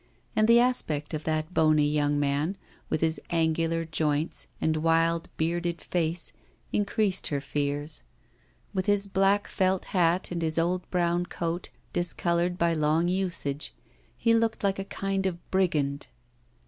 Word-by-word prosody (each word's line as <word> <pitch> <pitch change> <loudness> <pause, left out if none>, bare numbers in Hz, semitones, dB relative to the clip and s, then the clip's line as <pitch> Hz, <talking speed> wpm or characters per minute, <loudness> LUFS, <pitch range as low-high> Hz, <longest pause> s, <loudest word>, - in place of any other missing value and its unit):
And 215 - +4
the 235 +1 +7
aspect 165 - +1
of 155 0 -4
that 155 +1 -1
bony 155 -3 +4
young 145 -1 +1
man, 145 +6 0 0.3
with - - 0
his 160 0 +1
angular 165 0 +1
joints 155 -1 -1
and 160 0 +1
wild 165 +1 +2
bearded 170 +1 -1
face, 165 -6 -1 0.4
increased 205 -1 +1
her 145 - -1
fears. 145 +2 -2 0.7
With 185 0 -1
his 205 -1 +3
black 195 +1 +2
felt 190 -1 +1
hat 175 -1 +2
and 170 -1 -2
his 160 -1 +1
old 180 +2 0
brown 175 0 +1
coat, 170 0 -3 0.2
discoloured 175 0 0
by 170 -1 +2
long 155 +2 +2
usage, 170 - -2 0.4
he 230 - +3
looked 230 -1 +1
like 195 -1 +1
a 195 - -3
kind 195 -1 -1
of 180 -2 -3
brigand. 150 -7 +1
170 Hz, 145 wpm, -27 LUFS, 155-185 Hz, 0.7 s, the